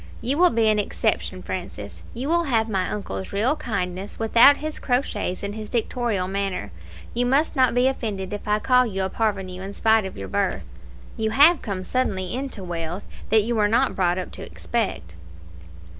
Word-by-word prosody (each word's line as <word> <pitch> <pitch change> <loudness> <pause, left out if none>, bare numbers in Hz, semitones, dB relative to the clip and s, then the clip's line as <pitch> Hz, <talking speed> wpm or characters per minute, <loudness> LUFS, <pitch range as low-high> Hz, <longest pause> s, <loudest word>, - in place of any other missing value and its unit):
You 265 +6 -1
will 360 0 +7
be 225 -1 +2
an 215 -1 +3
exception, 205 - -1
Francis. - - -6
You 255 +4 -3
will 340 +2 +2
have 225 -5 +1
my 190 -4 -1
uncle's 95 - -5
real 230 +9 +1
kindness 190 - -4
without 235 +5 +6
his 310 0 -5
crotchets 245 -8 -1
and 200 0 -3
his 215 0 -7
dictatorial 235 -5 -1
manner. 195 - -3 0.4
You 245 +1 +1
must 280 +6 +2
not 255 -3 +3
be 250 +1 +4
offended 210 -7 -3
if 205 - -6
I 210 0 +3
call 250 +3 +3
you 195 -3 -2
a 190 - -2
parvenu 195 -4 -2
in 195 +1 -6
spite 220 0 +3
of - - -10
your 95 - -6
birth. - - -1 0.5
You 220 0 0
have 295 +8 +6
come 195 -4 -4
suddenly 190 -6 -1
into 255 -6 -4
wealth 170 +1 -4 0.3
that 220 0 +4
you 235 +3 -1
were 210 -2 +3
not 240 +5 +2
brought 180 -1 +1
up 185 - -4
to - - -9
expect." 195 - -3
215 Hz, 190 wpm, -24 LUFS, 190-245 Hz, 0.5 s, will